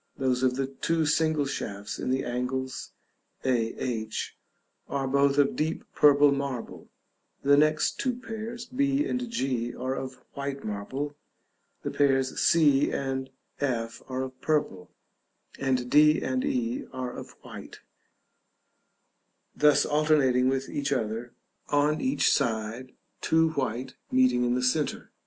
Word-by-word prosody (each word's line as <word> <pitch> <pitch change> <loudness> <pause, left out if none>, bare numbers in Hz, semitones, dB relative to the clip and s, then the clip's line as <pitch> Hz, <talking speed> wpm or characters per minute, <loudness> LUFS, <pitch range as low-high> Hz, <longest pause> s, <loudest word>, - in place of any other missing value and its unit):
Those 130 -2 +1
of 130 -1 +2
the 135 0 0
two 160 +4 -1
single 155 -1 +2
shafts 105 -6 -5
in - - -3
the 130 +1 +1
angles 125 +1 -3 0.6
(a, 120 -3 +1
h) 110 -3 -3 0.5
are 135 -1 -1
both 140 +1 +3
of 140 -1 +3
deep 160 +2 -1
purple 145 -1 +6
marble; 140 -4 -4 0.5
the 140 +1 +4
two 140 - +7
next 155 - +1
pairs, 230 +1 -6
b 275 +3 +1
and 250 -1 -2
g, 130 - -2
are 130 +1 -2
of 130 -1 -5 0.2
white 140 0 -4
marble; 130 +8 -4 0.7
the - - -2
pairs 135 -2 +1
c 145 -4 +4
and 135 -1 -2 0.3
f 115 -5 -2
are 130 0 -2
of 130 0 -8
purple, 145 -12 -1 0.7
and 130 -2 0
d 150 +2 +6
and 130 -1 -1
e 120 -1 -1
are 130 -1 -4
of - - -9
white: - - -10 1.7
thus 150 -1 +4
alternating 145 -4 +3
with 135 0 -1
each 140 0 -3
other 115 -1 -2 0.3
on 145 +1 +2
each 260 - +2
side; 115 +3 -2 0.3
two 160 0 +3
white 130 -4 -3 0.2
meeting 125 -1 +3
in 120 0 +1
the 125 - -1
centre. 145 +4 0
135 Hz, 135 wpm, -27 LUFS, 125-150 Hz, 1.7 s, two